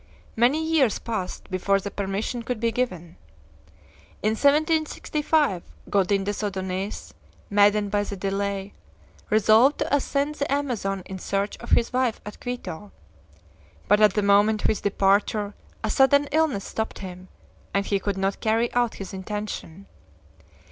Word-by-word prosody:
Many 265 +8 +3
years 305 -8 +3
passed 215 -5 -5
before 195 +2 +2
the 200 +1 -6
permission 200 +5 -3
could 235 0 -3
be 230 0 +1
given. 180 -9 -3 1.1
In 215 - +3
1765 300 - +1 0.3
Godin 195 0 +2
des 205 +2 -3
Odonais, 190 0 -4 0.4
maddened 205 0 +4
by 205 0 +1
the 200 -1 -6
delay, 195 +1 -2 0.6
resolved 220 +6 +5
to - - +1
ascend 285 +1 0
the 285 -2 -3
Amazon 230 -9 -1
in 190 -1 -7
search 200 +3 -2
of 235 - -10
his 235 - +2
wife 255 -3 +1
at 210 - -9
Quito; 210 -6 -6 1.0
but 210 +1 +4
at 210 - +5
the 210 - +1
moment 205 +2 +4
of - - +2
his 215 - 0
departure 205 +1 +1 0.3
a 220 - 0
sudden 280 +2 +4
illness 300 -9 +1
stopped 220 0 -4
him, 185 -1 -8 0.4
and 200 0 0
he 200 -1 0
could 200 0 -2
not 195 +1 -1
carry 225 +2 +1
out 240 -2 +1
his 195 -1 -8
intention. 195 -2 -6
210 Hz, 145 wpm, -25 LUFS, 195-245 Hz, 1.1 s, resolved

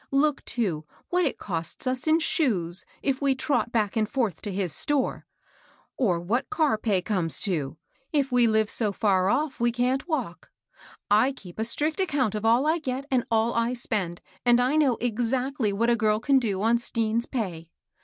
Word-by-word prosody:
Look, 280 +1 +1
too, 180 -11 -2 0.2
what 360 0 +2
it 275 - -1
costs 165 +1 -5
as 255 +2 -1
in 315 +1 +5
shoes, 190 - +1 0.2
if 270 -1 0
we 275 -1 +2
trot 260 -3 0
back 215 -4 0
and 220 -1 +1
forth 230 - -1
to 205 - -4
his 190 -4 -1
store; 290 -3 -1 0.7
or 190 -10 +1
what 210 +9 -1
car 310 - +1
pay 200 -5 0
comes 180 -7 0
to, 155 -7 -1 0.3
if 280 -3 +1
we 245 -1 +4
live 220 -1 +2
so 205 -2 0
&.r 190 -3 +3
off 275 +2 0
we 240 0 +2
can't 250 +5 0
walk* 255 - -3 0.6
I 220 +6 +5
keep 185 -7 -13
a - - +1
strict 300 +8 0
account 285 - +1
of 210 0 -3
all 235 +5 +4
I 320 +2 +2
get 265 -2 -4
and 250 -2 +2
all 225 +1 +2
I 230 +2 0
spend, 195 -8 -2 0.2
and 240 0 +5
I 255 +4 +2
know 285 -6 +3
exactly 245 +1 -1
what 230 +4 +1
a - - +4
girl 215 -2 +1
can 270 +3 +3
do 205 -5 -2
on 230 +1 +3
Stean's 230 0 -1
pay. 175 - -4
235 Hz, 190 wpm, -26 LUFS, 205-265 Hz, 0.7 s, in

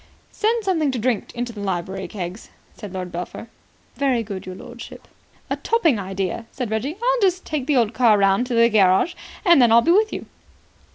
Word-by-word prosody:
"Send 450 +1 0
something 325 -7 +1
to - - -2
drink 235 -2 -1
into 240 0 -4
the 210 - -9
library, 190 0 -3
Keggs," 185 0 -7 0.3
said 205 -4 -9
Lord 180 -1 -5
Belpher. 180 +6 -6 0.5
"Very 260 -4 +1
good, 195 -3 -7
your 185 - -6
lordship." 240 +4 -11 0.4
"A - - -2
topping 335 - +1
idea," 195 +3 -4
said 250 -5 -5
Reggie. 245 +9 -2
"I'll - - 0
just 370 -2 +1
take 290 -4 -3
the 295 -3 +2
old 230 -2 +2
car 235 -4 +4
round 195 +4 +2
to 245 - -2
the 230 0 +6
garage, 205 - +3 0.3
and 340 -6 +6
then 240 -2 +5
I'll 230 +1 +6
be 335 - +3
with 430 +4 +3
you." - - -5
235 Hz, 195 wpm, -22 LUFS, 195-300 Hz, 0.5 s, the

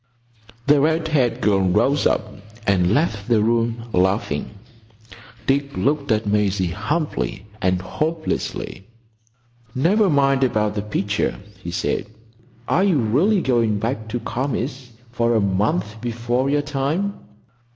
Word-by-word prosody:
The 145 0 +5
red 160 +2 +1
haired 130 -6 +1
girl 100 -2 +3
rose 115 +10 +3
up 110 - 0 0.4
and 90 -2 +3
left 110 -6 0
the 115 -2 +4
room, 115 0 +1
laughing. 95 -5 +1 1.0
Dick 140 +1 0
looked 140 -2 0
at 110 0 +1
Maisie 100 -3 +1
humbly 145 - -2 0.2
and 90 -1 +2
hopelessly. 155 - -3 0.9
"Never 195 +10 +3
mind 135 -2 +3
about 105 -4 +1
the 105 - -2
picture," 105 0 -1 0.3
he 85 - -6
said. 85 - -1 0.6
"Are 185 - +3
you 190 -6 +3
really 145 - +2
going 115 -6 +2
back 110 +1 -3
to 110 +2 -3
Kami's 130 +2 -3 0.2
for 120 -1 +1
a - - +4
month 100 +1 0
before 120 +2 -1
your 145 +1 +1
time?" 150 +8 -1
120 Hz, 130 wpm, -21 LUFS, 105-145 Hz, 1.0 s, The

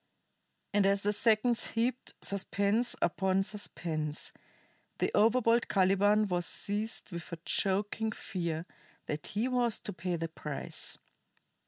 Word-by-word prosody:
And 200 -1 +4
as 200 0 +2
the 205 +1 +2
seconds 225 +2 +3
heaped 240 +2 -1
suspense 200 +4 +1
upon 190 +2 +2
suspense, 160 -7 -3 0.6
the - - 0
overbold 230 +2 +4
Caliban 205 +2 +4
was 175 -2 0
seized 210 +1 -2
with 170 -2 -6
a 170 - -4
choking 205 +3 0
fear 170 -5 -3 0.4
that 150 0 -4
he 215 +5 0
was 245 -3 +1
to 205 - -3
pay 180 -1 -2
the 165 0 -2
price. 150 -3 -5
200 Hz, 125 wpm, -32 LUFS, 180-220 Hz, 0.6 s, And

